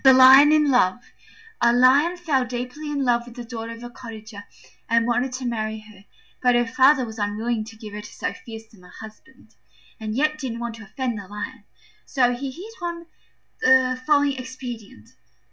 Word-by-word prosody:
THE 265 -1 +8
LION 265 +3 +8
IN 300 -2 +4
LOVE 245 -3 +3 0.6
A 235 - +5
Lion 270 +8 +4
fell 305 -7 +1
deeply 250 +5 -5
in 285 -2 -1
love 240 -1 +1
with 240 - -12
the 245 - -7
daughter 230 -1 -6
of 230 +1 -11
a 240 - -7
cottager 220 -4 -10 0.4
and 230 0 +3
wanted 245 +2 0
to 255 0 -5
marry 220 -2 -3
her; 210 -2 -17 0.4
but 250 -1 +3
her 240 0 +3
father 260 +3 +4
was 220 -1 -9
unwilling 215 +2 -2
to 225 0 -12
give 215 -1 -10
her 210 - -6
to 210 - -12
so - - -4
fearsome 225 -4 -12
a 180 - -16
husband, 180 - -14 0.5
and 215 -1 -4
yet 305 +3 +1
didn't 250 -5 -4
want 235 -1 -4
to 220 - -11
offend 240 +1 -3
the 195 - -10
Lion; 210 +3 -7 0.4
so 245 -3 +1
he 270 +3 -4
hit 370 +11 -10
upon 340 -1 -5 0.6
the 255 0 +4
following 285 -2 +3
expedient. 245 - -9
245 Hz, 190 wpm, -23 LUFS, 220-265 Hz, 0.6 s, THE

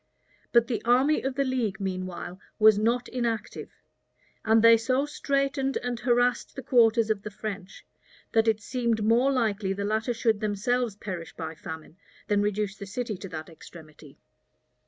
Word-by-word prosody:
But 235 -1 +5
the 235 - -3
army 260 +6 +3
of 265 0 -3
the 275 - +1
league, 240 -6 -1
meanwhile, 185 -1 -5 0.2
was 215 -1 +6
not 235 +3 +1
inactive; 230 -4 -3 0.7
and 220 0 +4
they 230 0 +9
so 255 +5 +1
straitened 275 -1 -1
and 245 -1 -4
harassed 245 0 +1
the 270 - -6
quarters 230 -3 +4
of 210 -2 -1
the 210 - -6
French, 200 -2 -7 0.5
that 225 0 +3
it 215 -1 +2
seemed 235 -2 -1
more 235 +5 +3
likely 215 -6 0
the 200 +1 -3
latter 220 +3 -1
should 225 -2 +1
themselves 215 +2 -1
perish 185 -5 -7
by 160 -1 -5
famine, 160 0 -9 0.3
than 205 -1 +3
reduce 205 -1 -1
the 200 - -8
city 220 +1 -4
to 195 +1 -8
that 155 -2 -7
extremity. 155 -3 -14
220 Hz, 160 wpm, -27 LUFS, 200-245 Hz, 0.7 s, they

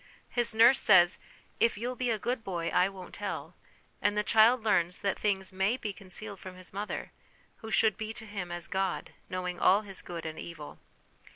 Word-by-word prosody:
His 240 -2 +1
nurse 235 +4 +7
says, 175 -4 +5 0.2
" - - -30
If 230 -2 +3
you'll 245 +4 -3
be 250 0 -1
a 225 - +1
good 240 +2 -2
boy, 170 -4 -2
I 180 +2 +3
won't 190 -2 -11
tell - - -5 0.3
"; - - -36
and 205 0 +1
the 210 - +2
child 225 +3 +5
learns 180 -5 +2
that 200 - 0
things 190 -2 -1
may 190 +6 +1
be 210 -5 -4
concealed 200 +1 -6
from 185 -1 -9
his 185 0 -5
mother, 205 +2 -4 0.5
who 220 - -9
should 215 -2 +3
be 220 0 -4
to 220 -1 -8
him 195 -4 -5
as 175 0 -4
God, 190 0 -2 0.2
knowing 180 -1 -3
all 195 +3 +5
his 195 -3 -6
good 170 -2 -7
and 160 0 -5
evil. 155 -4 -9
195 Hz, 205 wpm, -30 LUFS, 180-220 Hz, 0.5 s, nurse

